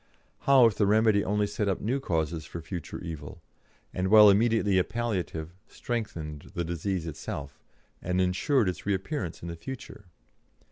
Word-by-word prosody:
How 135 Hz, -3 st, +7 dB
if 115 Hz, -, +4 dB
the 100 Hz, -, +3 dB
remedy 110 Hz, -1 st, +4 dB
only 105 Hz, +1 st, +1 dB
set 105 Hz, 0 st, -2 dB
up 95 Hz, -, -1 dB
new 125 Hz, +6 st, -1 dB
causes 80 Hz, -, -1 dB
for 75 Hz, -, -8 dB
a -, -, -6 dB
future 85 Hz, -1 st, -6 dB
evil, 80 Hz, 0 st, -7 dB, 0.5 s
and, 90 Hz, +1 st, -1 dB
while 105 Hz, 0 st, +8 dB
immediately 105 Hz, -2 st, +3 dB
a -, -, +3 dB
palliative, 95 Hz, -8 st, -3 dB, 0.2 s
strengthened 80 Hz, -11 st, -5 dB
the 85 Hz, -, -1 dB
disease 85 Hz, +1 st, -2 dB
itself, 70 Hz, -3 st, -6 dB, 0.4 s
and 90 Hz, +1 st, -1 dB
ensured 95 Hz, +7 st, +2 dB
its 90 Hz, +2 st, -4 dB
reappearance 95 Hz, -, -2 dB
in -, -, -5 dB
the 85 Hz, -, -5 dB
future? 120 Hz, +2 st, -9 dB
95 Hz, 160 wpm, -28 LUFS, 85-110 Hz, 0.5 s, while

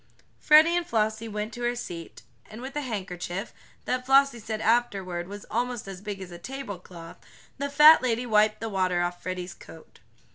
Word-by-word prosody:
Freddie 310 Hz, +3 st, +6 dB
and 350 Hz, -1 st, -1 dB
Flossie 220 Hz, 0 st, 0 dB
went 210 Hz, +1 st, -4 dB
to 240 Hz, -, -8 dB
her 240 Hz, 0 st, 0 dB
seat, 175 Hz, -8 st, -8 dB, 0.3 s
and 215 Hz, -, -10 dB
with 265 Hz, +3 st, -8 dB
a 295 Hz, -, -1 dB
handkerchief, 195 Hz, -4 st, -5 dB, 0.3 s
that 255 Hz, 0 st, -1 dB
Flossie 270 Hz, -1 st, +4 dB
said 220 Hz, 0 st, -5 dB
afterward 200 Hz, -7 st, 0 dB
was 205 Hz, +1 st, -9 dB
almost 240 Hz, -2 st, -2 dB
as 190 Hz, -1 st, -8 dB
big 205 Hz, -1 st, -6 dB
as 185 Hz, -2 st, -9 dB
a 175 Hz, -, -9 dB
table 255 Hz, -2 st, -6 dB
cloth, 170 Hz, -2 st, -12 dB, 0.4 s
the 280 Hz, 0 st, -2 dB
fat 300 Hz, +3 st, +8 dB
lady 245 Hz, -1 st, 0 dB
wiped 215 Hz, -1 st, +2 dB
the 225 Hz, -, -3 dB
water 185 Hz, -3 st, +1 dB
off 175 Hz, 0 st, -4 dB
Freddie's 180 Hz, -1 st, -5 dB
coat. 160 Hz, -2 st, -15 dB
215 Hz, 185 wpm, -26 LUFS, 185-245 Hz, 0.4 s, fat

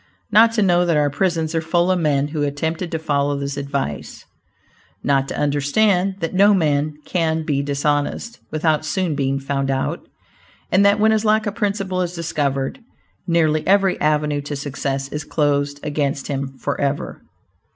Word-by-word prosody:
Not 225 Hz, +2 st, +6 dB
to 215 Hz, -2 st, +2 dB
know 175 Hz, -2 st, +3 dB
that 170 Hz, -3 st, +2 dB
our 145 Hz, -1 st, +2 dB
prisons 160 Hz, +1 st, 0 dB
are 165 Hz, -, 0 dB
full 175 Hz, +3 st, +1 dB
of 185 Hz, -, +1 dB
men 145 Hz, -3 st, +1 dB
who 150 Hz, 0 st, -3 dB
attempted 160 Hz, +4 st, -2 dB
to 165 Hz, -, -2 dB
follow 145 Hz, -2 st, 0 dB
this 140 Hz, 0 st, -3 dB
advice; 140 Hz, -, -4 dB, 0.8 s
not 135 Hz, -1 st, +2 dB
to -, -, -5 dB
understand 180 Hz, +7 st, +2 dB
that 165 Hz, -, -2 dB
no 200 Hz, +2 st, +5 dB
man 150 Hz, -3 st, +1 dB
can 160 Hz, -2 st, 0 dB
be 140 Hz, -2 st, 0 dB
dishonest, 145 Hz, +9 st, -1 dB
without 155 Hz, -1 st, +1 dB
soon 175 Hz, +1 st, -1 dB
being 135 Hz, -1 st, 0 dB
found 135 Hz, 0 st, -2 dB
out, 135 Hz, 0 st, -1 dB, 0.7 s
and 190 Hz, +3 st, +4 dB
that 200 Hz, +1 st, +4 dB
when 220 Hz, +1 st, +4 dB
his 220 Hz, 0 st, +1 dB
lack 215 Hz, 0 st, +2 dB
of 205 Hz, -, -2 dB
principle 200 Hz, -4 st, -1 dB
is 180 Hz, 0 st, -3 dB
discovered, 145 Hz, -, -2 dB, 0.5 s
nearly 160 Hz, -2 st, +2 dB
every 195 Hz, -1 st, +3 dB
avenue 150 Hz, -1 st, +1 dB
to 145 Hz, +1 st, -5 dB
success 140 Hz, -1 st, -3 dB
is 150 Hz, +1 st, -4 dB
closed 145 Hz, -2 st, 0 dB
against 145 Hz, -2 st, -2 dB
him 135 Hz, -1 st, -4 dB
forever. 140 Hz, +1 st, -2 dB
155 Hz, 165 wpm, -20 LUFS, 140-180 Hz, 0.8 s, Not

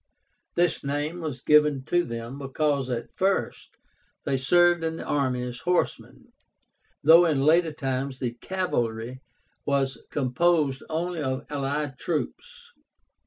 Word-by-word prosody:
This 175 Hz, -1 st, +1 dB
name 145 Hz, +4 st, -2 dB
was 150 Hz, -6 st, -5 dB
given 150 Hz, -2 st, +4 dB
to 175 Hz, +2 st, +2 dB
them 115 Hz, -1 st, -6 dB
because 140 Hz, -1 st, -1 dB
at 120 Hz, -2 st, -4 dB
first 195 Hz, +1 st, -1 dB, 0.5 s
they 140 Hz, -, +1 dB
served 175 Hz, +5 st, +4 dB
in 160 Hz, 0 st, -1 dB
the -, -, -6 dB
army 130 Hz, -4 st, 0 dB
as 125 Hz, 0 st, -5 dB
horsemen, 180 Hz, +6 st, -2 dB, 0.7 s
though 165 Hz, +3 st, +8 dB
in 145 Hz, -4 st, +1 dB
later 165 Hz, +1 st, +4 dB
times 135 Hz, -2 st, -3 dB
the 125 Hz, -2 st, -3 dB
cavalry 120 Hz, -7 st, -3 dB, 0.4 s
was 135 Hz, -1 st, 0 dB
composed 145 Hz, +1 st, +1 dB
only 170 Hz, +1 st, -2 dB
of 130 Hz, -1 st, -2 dB
allied 140 Hz, -1 st, -2 dB
troops. 475 Hz, -, -4 dB
145 Hz, 125 wpm, -26 LUFS, 130-170 Hz, 0.7 s, though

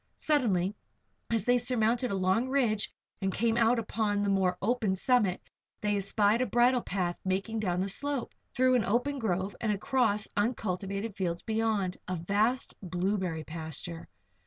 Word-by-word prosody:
Suddenly, 210 Hz, -, +1 dB, 0.6 s
as 225 Hz, -3 st, 0 dB
they 245 Hz, 0 st, +4 dB
surmounted 240 Hz, 0 st, +1 dB
a 200 Hz, -, -1 dB
long 190 Hz, +7 st, +1 dB
ridge 235 Hz, -6 st, +1 dB, 0.3 s
and 195 Hz, 0 st, 0 dB
came 225 Hz, +3 st, +1 dB
out 235 Hz, +1 st, +4 dB
upon 210 Hz, -2 st, 0 dB
the 200 Hz, -, +1 dB
more 185 Hz, -2 st, +2 dB
open 215 Hz, -3 st, +1 dB
summit, 210 Hz, -3 st, +2 dB, 0.4 s
they 210 Hz, -1 st, 0 dB
espied 205 Hz, +3 st, +2 dB
a 255 Hz, -, +1 dB
bridle 240 Hz, +3 st, +3 dB
path 180 Hz, -4 st, -2 dB
making 195 Hz, +4 st, -1 dB
down 180 Hz, -4 st, 0 dB
the 195 Hz, -, 0 dB
slope, 280 Hz, +5 st, -2 dB, 0.2 s
through 255 Hz, 0 st, +4 dB
an 245 Hz, -3 st, +3 dB
open 260 Hz, +6 st, 0 dB
grove 190 Hz, -3 st, -1 dB
and 220 Hz, -, +1 dB
across 210 Hz, -1 st, +1 dB
uncultivated 205 Hz, -1 st, -2 dB
fields 170 Hz, -3 st, -2 dB
beyond 220 Hz, -4 st, 0 dB
a 185 Hz, -, -1 dB
vast 205 Hz, +9 st, 0 dB
blueberry 180 Hz, -2 st, -1 dB
pasture. 160 Hz, +1 st, -6 dB
210 Hz, 155 wpm, -30 LUFS, 190-235 Hz, 0.6 s, they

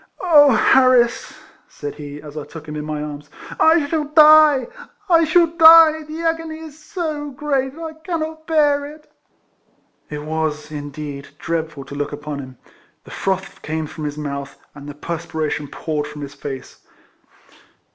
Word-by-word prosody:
'* -, -, -37 dB
Oh! 305 Hz, -6 st, +6 dB
Harris 255 Hz, -3 st, +3 dB, 0.2 s
!" -, -, -29 dB
said 145 Hz, -1 st, -7 dB
he, 145 Hz, 0 st, -9 dB
as 150 Hz, -1 st, -11 dB
I 150 Hz, -, -5 dB
took 160 Hz, 0 st, -11 dB
him 150 Hz, -, -6 dB
in 150 Hz, -, -4 dB
my 150 Hz, -1 st, -4 dB
arms, 145 Hz, -1 st, -8 dB, 0.2 s
" -, -, -11 dB
I 330 Hz, -3 st, +2 dB
shall 300 Hz, +1 st, -1 dB
die! 305 Hz, -2 st, +6 dB, 0.4 s
I 335 Hz, -3 st, +5 dB
shall 340 Hz, +2 st, +4 dB
die! 325 Hz, -1 st, +7 dB
The 310 Hz, +2 st, -7 dB
agony 325 Hz, -1 st, -2 dB
is 315 Hz, -1 st, -11 dB
so 310 Hz, -5 st, -4 dB
great 270 Hz, -1 st, -2 dB
that 330 Hz, -, -9 dB
I 320 Hz, -1 st, -6 dB
cannot 315 Hz, -1 st, -5 dB
bear 295 Hz, -3 st, +2 dB
it." 300 Hz, +1 st, -14 dB, 1.0 s
It 150 Hz, -1 st, -6 dB
was, 155 Hz, -1 st, -3 dB
indeed, 145 Hz, -1 st, -7 dB
dreadful 160 Hz, -4 st, -4 dB
to 140 Hz, -, -10 dB
look 145 Hz, 0 st, -3 dB
upon 150 Hz, 0 st, -6 dB
him; 130 Hz, -2 st, -10 dB, 0.5 s
the -, -, -14 dB
froth 190 Hz, 0 st, -3 dB
came 160 Hz, 0 st, -3 dB
from 155 Hz, 0 st, -7 dB
his 145 Hz, 0 st, -4 dB
mouth, 140 Hz, -2 st, -6 dB, 0.2 s
and 145 Hz, 0 st, -10 dB
the 145 Hz, -, -9 dB
perspiration 155 Hz, -2 st, -4 dB
poured 150 Hz, +1 st, -4 dB
from 150 Hz, 0 st, -8 dB
his 140 Hz, 0 st, -8 dB
face. 140 Hz, -2 st, -8 dB
170 Hz, 170 wpm, -20 LUFS, -, 1.0 s, die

